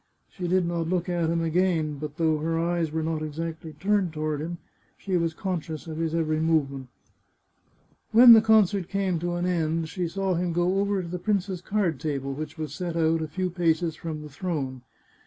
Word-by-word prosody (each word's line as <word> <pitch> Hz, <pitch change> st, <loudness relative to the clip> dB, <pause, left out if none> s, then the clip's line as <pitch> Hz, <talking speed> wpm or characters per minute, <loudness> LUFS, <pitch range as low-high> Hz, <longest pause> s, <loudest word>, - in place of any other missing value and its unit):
She 180 Hz, -2 st, -4 dB
did 185 Hz, 0 st, +2 dB
not 170 Hz, -1 st, -2 dB
look 180 Hz, -1 st, 0 dB
at 170 Hz, -2 st, 0 dB
him 165 Hz, 0 st, +1 dB
again. 165 Hz, -3 st, +1 dB
But 150 Hz, +1 st, -6 dB
though 160 Hz, -2 st, +2 dB
her 165 Hz, +2 st, -1 dB
eyes 170 Hz, -1 st, 0 dB
were 160 Hz, 0 st, -1 dB
not 160 Hz, -1 st, -2 dB
exactly 160 Hz, +1 st, -5 dB
turned 190 Hz, +1 st, 0 dB
toward 155 Hz, -1 st, -2 dB
him, 170 Hz, +2 st, -4 dB, 0.4 s
she 190 Hz, -2 st, -3 dB
was 165 Hz, -2 st, 0 dB
conscious 170 Hz, -5 st, -4 dB
of 160 Hz, -2 st, -6 dB
his 165 Hz, 0 st, -1 dB
every 155 Hz, -2 st, 0 dB
movement. 140 Hz, -5 st, 0 dB, 1.2 s
When 235 Hz, +1 st, +10 dB
the 220 Hz, -, +8 dB
concert 210 Hz, -4 st, +3 dB
came 195 Hz, -4 st, 0 dB
to 175 Hz, +1 st, -2 dB
an 175 Hz, 0 st, -1 dB
end, 165 Hz, -2 st, 0 dB
she 180 Hz, 0 st, -2 dB
saw 190 Hz, +3 st, -1 dB
him 175 Hz, 0 st, -1 dB
go 175 Hz, +3 st, +1 dB
over 200 Hz, -1 st, 0 dB
to -, -, -7 dB
the 180 Hz, +1 st, -4 dB
prince's 195 Hz, -2 st, -1 dB
card 180 Hz, -7 st, 0 dB
table, 140 Hz, -3 st, -3 dB
which 155 Hz, +3 st, -6 dB
was 155 Hz, -1 st, -5 dB
set 175 Hz, -3 st, -4 dB
out 165 Hz, 0 st, +2 dB
a 160 Hz, -, -2 dB
few 185 Hz, +4 st, -2 dB
paces 170 Hz, -2 st, +1 dB
from 155 Hz, -2 st, -6 dB
the 150 Hz, -, -9 dB
throne. 140 Hz, -5 st, -4 dB
165 Hz, 200 wpm, -26 LUFS, 155-180 Hz, 1.2 s, When